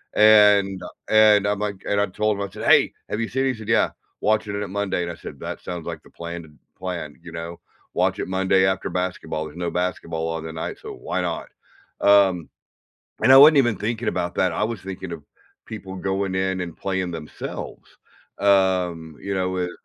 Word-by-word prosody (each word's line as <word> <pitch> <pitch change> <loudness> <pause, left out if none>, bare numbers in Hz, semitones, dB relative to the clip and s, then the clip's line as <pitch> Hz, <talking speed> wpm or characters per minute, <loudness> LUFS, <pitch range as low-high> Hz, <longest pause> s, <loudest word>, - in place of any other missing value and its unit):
and, 105 -3 +6
uh, - - -6 0.2
and 105 -2 +6
I'm 105 0 0
like 100 -2 -4
and 100 0 +1
I - - +3
told 105 +2 0
him, 100 - -2
I - - -16
said, - - -7
"Hey. - - +5 0.2
Have 105 - -2
you 115 - -1
seen 130 +1 0
it?" - - +2
He - - -8
said, 110 -1 -10
"Yeah, 115 - +3 0.3
watching 105 -1 +1
it 105 - -2
at 100 - -6
Monday," 100 -3 -1
and 85 - -4
I - - -8
said, - - -10
"That - - -5
sounds 90 -2 -6
like 85 -2 -5
the - - -18
planned 85 -1 -7 0.3
plan, 90 -5 -5
you 85 - -10
know? 85 +1 -6 0.3
Watch - - +1
it - - -3
Monday 95 0 +3
after 95 0 0
basketball. 90 -4 -3
There's 75 +2 -10
no 85 -1 -2
basketball 85 -2 -2
on 80 -1 -3
the 80 - -6
night, 80 - -5
so - - -8
why - - -4
not?" - - -3 0.5
Um, 95 -4 +4 0.8
and 130 - +6
I - - +10
wasn't 150 +2 +9
even 120 -6 +3
thinking 115 +3 -3
about 90 0 -2
that. 90 -2 +2
I 95 - -2
was 110 -4 -4
thinking 95 -1 -7
of 80 -4 -8 0.4
people 95 -4 -7
going 95 0 -2
in 95 0 0
and 85 -2 -5
playing 95 -2 -2
themselves, 80 -2 -8 0.4
um, 90 -5 +2
you 100 - -4
know, 95 -1 0
with 90 -1 -2
95 Hz, 210 wpm, -23 LUFS, 85-105 Hz, 0.8 s, I